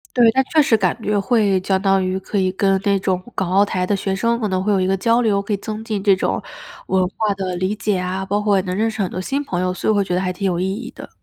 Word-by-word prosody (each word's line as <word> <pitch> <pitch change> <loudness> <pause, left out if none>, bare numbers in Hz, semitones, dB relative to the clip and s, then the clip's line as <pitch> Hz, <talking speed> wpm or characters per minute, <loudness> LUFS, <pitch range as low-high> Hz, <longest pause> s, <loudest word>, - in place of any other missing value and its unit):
对， 240 -2 +6
但 265 +2 +2
确 310 +2 +3
实 230 -5 +3
感 185 -4 +1
觉 210 -1 0
会 205 -3 +2
相 190 0 +1
当 195 -1 +2
于 185 +1 -1
可 200 +2 -4
以 185 -1 +1
跟 195 0 +1
那 200 -1 +2
种 185 -1 0 0.2
港 190 -2 -1
澳 200 +2 +4
台 185 -2 -2
的 205 - 0
学 195 0 -2
生 230 +4 0
可 220 - -1
能 185 -1 -1
会 210 - +1
有 195 - +2
一 185 - +1
个 190 +1 +1
交 230 +5 +2
流， 200 -3 +2
可 200 - -7
以 205 - +1
增 215 +2 -6
进 215 -3 -3
这 200 -2 +5
种， 185 - -1 0.5
文 190 -1 +2
化 215 -2 +1
的 190 -2 -4
理 185 +3 -1
解 210 -2 -1
啊， 185 +1 -3
包 200 +2 -1
括 210 -1 +2
也 190 - +2
能 180 -1 -4
认 225 +2 +1
识 220 -1 -4
很 190 - -1
多 - - -5
新 275 +10 -2
朋 180 -10 -3
友， 185 0 0
所 - - -2
以 - - +6
我 - - +1
会 200 - +3
觉 185 - -3
得 180 - +1
还 185 -1 -1
挺 190 +2 -5
有 180 -3 0
意 190 +1 0
义 240 +5 -6
的。 - - -11
195 Hz, 340 characters per minute, -20 LUFS, 185-215 Hz, 0.5 s, 对